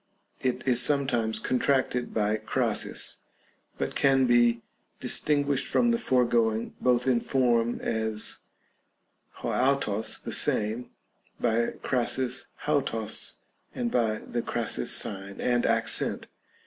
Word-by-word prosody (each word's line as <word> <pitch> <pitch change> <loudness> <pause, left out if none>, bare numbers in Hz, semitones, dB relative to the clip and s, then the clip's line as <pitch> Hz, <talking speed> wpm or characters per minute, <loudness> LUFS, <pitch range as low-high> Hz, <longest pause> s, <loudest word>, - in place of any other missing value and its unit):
It 130 +1 -2
is 125 -1 +4
sometimes 120 -6 +1
contracted 125 +1 0
by 105 0 0
Crasis, - - -1 0.6
but - - -3
can 135 -1 +3
be 120 -1 +3 0.4
distinguished 145 -2 +1
from 240 -1 +2
the 235 - +1
foregoing 120 - +1
both 125 -1 +2
in 130 -3 +3
form, 120 -3 +1
as 110 -1 -2 1.0
6 - - -15
avTos 125 -5 0
(the - - -5
same) 110 +4 +1 0.5
by 115 0 +1
Crasis 130 0 +1 0.2
avros, 115 -7 0 0.4
and 120 -1 -2
by 110 -3 +1
the 120 - -4
Crasis - - -1
sign 95 0 -1
and 120 -1 +1
accent. - - 0
120 Hz, 110 wpm, -27 LUFS, 110-130 Hz, 1.0 s, is